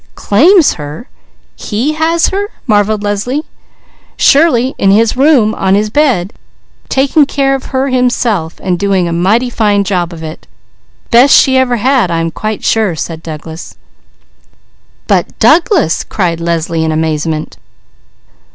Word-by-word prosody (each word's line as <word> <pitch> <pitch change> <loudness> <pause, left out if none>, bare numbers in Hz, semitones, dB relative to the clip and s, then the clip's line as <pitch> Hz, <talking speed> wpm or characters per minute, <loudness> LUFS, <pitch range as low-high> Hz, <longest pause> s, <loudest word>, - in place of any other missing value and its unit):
"Claims 325 - +3
her! 150 - -8 0.5
He 240 +8 -2
has 325 +2 +1
her?" 400 +1 -3 0.2
marvelled 210 -2 +1
Leslie. 210 +9 -2 0.7
"Surely! 275 -4 +3
In 195 - +2
his 220 +3 +2
room! 260 -6 +3
On 190 0 0
his 210 +1 -1
bed! 235 -10 0 0.6
Taking 275 +2 +2
care 275 -1 0
of 270 - -4
her 265 +1 -2
himself, 240 -9 -1
and 180 -2 -1
doing 195 -3 0
a 170 - -3
mighty 215 +9 +1
fine 205 -3 +1
job 180 -3 -2
of 165 -1 -9
it! 155 0 -9 0.6
Best 250 +4 +6
she 265 - +4
ever 260 -2 +2
had 250 -3 +1
I 165 -1 -1
am 165 0 -2
quite 215 +4 -5
sure," 215 -6 +1
said 160 +1 -6
Douglas. 160 +1 -9 1.3
"But - - -1
Douglas!" 330 - +2
cried 170 -4 -2
Leslie 165 -1 -2
in 160 - -1
amazement. 155 0 -3
215 Hz, 140 wpm, -11 LUFS, 170-265 Hz, 1.3 s, Best